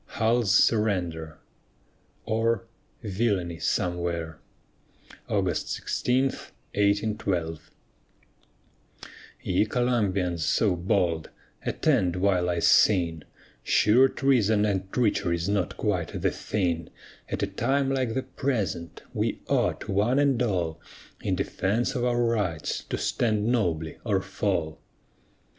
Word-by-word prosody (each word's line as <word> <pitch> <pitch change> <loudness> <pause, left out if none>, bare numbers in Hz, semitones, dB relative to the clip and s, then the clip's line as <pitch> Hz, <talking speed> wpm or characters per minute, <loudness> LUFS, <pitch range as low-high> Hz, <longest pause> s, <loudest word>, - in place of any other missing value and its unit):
HULL'S 115 -1 +2
SURRENDER 90 -8 0 0.9
OR, 115 -1 0 0.4
VILLANY 95 -5 -1
SOMEWHERE 85 -3 -2 0.9
[August - - 0
16, 125 +2 0 0.5
1812] 100 -6 0 1.7
Ye 90 +2 +2
Columbians 105 -8 0
so 90 +5 +2
bold, 85 -2 0 0.3
attend 90 -1 +1
while 90 -1 +1
I 85 - 0
sing; 85 -3 +3 0.4
Sure 115 - +4
treason 110 -7 +2
and 95 -2 -2
treachery's 90 -7 0
not 100 -3 -1
quite - - -1
the - - +1
thing, 85 -5 -2 0.4
At - - -2
a - - +4
time 135 0 0
like 130 -4 -1
the 130 - -1
present, 100 - -3
we - - -1
ought, - - 0
one 105 +7 +1
and 140 -4 +2
all, 90 -9 -1 0.4
In - - 0
defence 110 +6 -1
of 125 - -2
our 120 -1 +2
rights, 105 -9 -1
to - - -3
stand 110 -3 0
nobly 85 -10 0
or 100 -5 0
fall. 95 -5 -2
100 Hz, 105 wpm, -26 LUFS, 85-115 Hz, 1.7 s, Sure